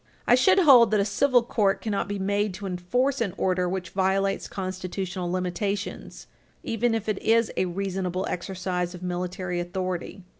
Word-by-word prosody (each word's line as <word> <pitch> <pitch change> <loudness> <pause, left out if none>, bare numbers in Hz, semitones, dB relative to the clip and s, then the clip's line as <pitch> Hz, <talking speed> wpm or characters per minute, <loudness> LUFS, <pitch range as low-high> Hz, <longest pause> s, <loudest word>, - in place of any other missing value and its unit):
I - - +4
should 260 +11 +5
hold 265 - +7
that 215 0 +2
a 200 - +2
civil 245 +4 +3
court 205 -4 +1
cannot 205 -3 -2
be 205 0 -3
made 200 0 0
to 200 +2 -7
enforce 235 +9 0
an 200 -5 -1
order 180 -1 +1
which 180 -2 -4
violates 195 +1 0
constitutional 185 -1 -4
limitations 185 +3 -3 0.4
even 225 +1 0
if 225 -1 -3
it 210 -2 -1
is 230 0 +3
a - - +1
reasonable 185 0 -2
exercise 180 0 -3
of 180 - -10
military 180 0 -3
authority. 185 +1 -4
190 Hz, 160 wpm, -26 LUFS, 180-210 Hz, 0.4 s, hold